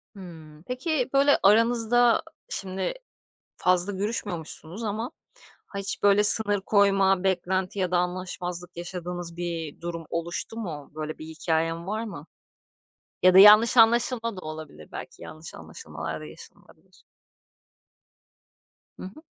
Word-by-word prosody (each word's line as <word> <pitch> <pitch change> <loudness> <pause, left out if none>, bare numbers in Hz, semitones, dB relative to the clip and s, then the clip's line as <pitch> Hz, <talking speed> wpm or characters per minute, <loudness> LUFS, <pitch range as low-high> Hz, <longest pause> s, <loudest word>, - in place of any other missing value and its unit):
Hımm. 160 -5 -13
Peki, 255 - -3
böyle, 280 +1 +4
aranızda 230 +3 +3 0.3
şimdi 190 -1 -4 0.6
fazla 180 +2 +1
görüşmüyormuşsunuz 190 -2 0
ama 220 +5 -4 0.6
ha 200 - -7
hiç, 195 - -2
böyle, 205 0 +4
sınır 205 -1 +7
koyma, 195 -2 +2
beklenti 190 +1 -2
ya 185 -2 -2
da 180 - +2
anlaşmazlık 180 0 -4
yaşadığınız 175 -1 -6
bir 170 -4 -6
durum 170 -1 -6
oluştu 170 +6 -5
mu? 160 -10 -7
Böyle 155 0 -6
bir 155 - -10
hikâyen 165 +1 -3
var 215 +3 -3
mı? 215 -3 -9 1.0
Ya 185 0 +5
da 190 - +7
yanlış 215 +4 +7
anlaşılma 230 -1 +3
da - - -8
olabilir. 155 - -10
Belki - - -10
yanlış 155 +1 -10
anlaşılmalar 80 0 -9
da - - -9
yaşanılabilir. 75 - -17 2.0
Hı - - -9
hı. 190 +11 -11
185 Hz, 125 wpm, -25 LUFS, 165-210 Hz, 2.0 s, sınır